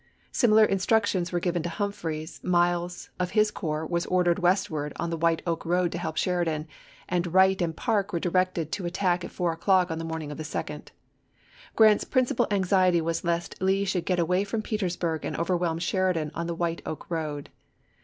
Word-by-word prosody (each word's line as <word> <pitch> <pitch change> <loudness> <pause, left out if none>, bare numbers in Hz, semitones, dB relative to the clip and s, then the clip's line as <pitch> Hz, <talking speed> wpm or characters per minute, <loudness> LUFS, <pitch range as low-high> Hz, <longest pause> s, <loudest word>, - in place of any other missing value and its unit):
Similar 220 -4 +5
instructions 195 -2 +1
were 175 - 0
given 175 -1 -1
to 175 - -3
Humphreys; 165 -5 -4
Miles, 175 0 0
of 180 -1 0
his 215 0 +4
corps, 155 -5 -3
was 170 +1 -1
ordered 180 -1 +2
westward 175 -5 0
on 170 0 -3
the - - 0
White 165 0 +1
Oak 170 -2 -2
road 175 0 +1
to 175 - -4
help 160 -2 -4
Sheridan, 165 -4 0 0.4
and 175 -1 -1
Wright 190 +1 +4
and 165 -2 -1
Parke 210 -5 0
were 170 - -1
directed 180 -2 0
to 190 -4 -2
attack 180 -1 0
at - - -5
four 175 -2 -1
o'clock 180 +1 +2
on 160 - -3
the - - -4
morning 160 -2 -4
of 145 - -8
the - - -3
2d. 150 - -5 0.9
Grant's 215 -2 +6
principal 255 -3 +1
anxiety 185 -3 +3
was 165 0 -1
April, 170 - 0
lsea - - +4
lest 170 +2 -9
Lee 195 +1 +2
should 190 -3 -1
get 180 - +1
away 180 +3 +2
from 215 +2 -3
Petersburg 175 -7 -2
and - - -3
overwhelm 170 -1 0
Sheridan 175 -3 0
on 170 0 -3
the 170 - -3
White 170 0 -2
Oak 155 - -6
road. 150 -3 -3
175 Hz, 195 wpm, -27 LUFS, 165-190 Hz, 0.9 s, Grant's